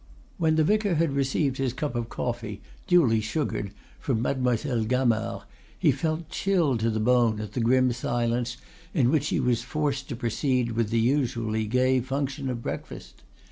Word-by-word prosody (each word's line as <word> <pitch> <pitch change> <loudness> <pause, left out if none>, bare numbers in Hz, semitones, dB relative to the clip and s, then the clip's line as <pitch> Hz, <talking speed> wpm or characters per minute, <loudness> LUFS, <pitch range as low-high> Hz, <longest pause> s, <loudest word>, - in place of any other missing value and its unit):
When 160 -2 +3
the 155 - +4
vicar 205 +1 +2
had 160 -1 +2
received 135 0 0
his 130 -3 -1
cup 145 0 -3
of 120 -1 -3
coffee, 120 -4 -4 0.2
duly 135 -12 +4
sugared, 110 -2 -2 0.3
from 125 -6 -1
Mademoiselle 125 -2 0
Gamard, 115 -4 0 0.3
he 160 -5 +4
felt 155 +4 -2
chilled 170 -13 +1
to 115 +1 +1
the 110 -1 -1
bone 115 -1 +3
at 105 -2 -5
the 125 - -3
grim 125 +2 +3
silence 120 0 -1 0.4
in 130 -6 +3
which 150 -2 +1
he - - 0
was 120 -2 +1
forced 140 0 -2
to - - -3
proceed 120 +1 0
with 115 -2 0
the 115 0 +1
usually 115 -4 0
gay 130 +3 +3
function 135 +1 -3
of 120 -2 -4
breakfast. - - -7
125 Hz, 170 wpm, -26 LUFS, 115-140 Hz, 0.4 s, the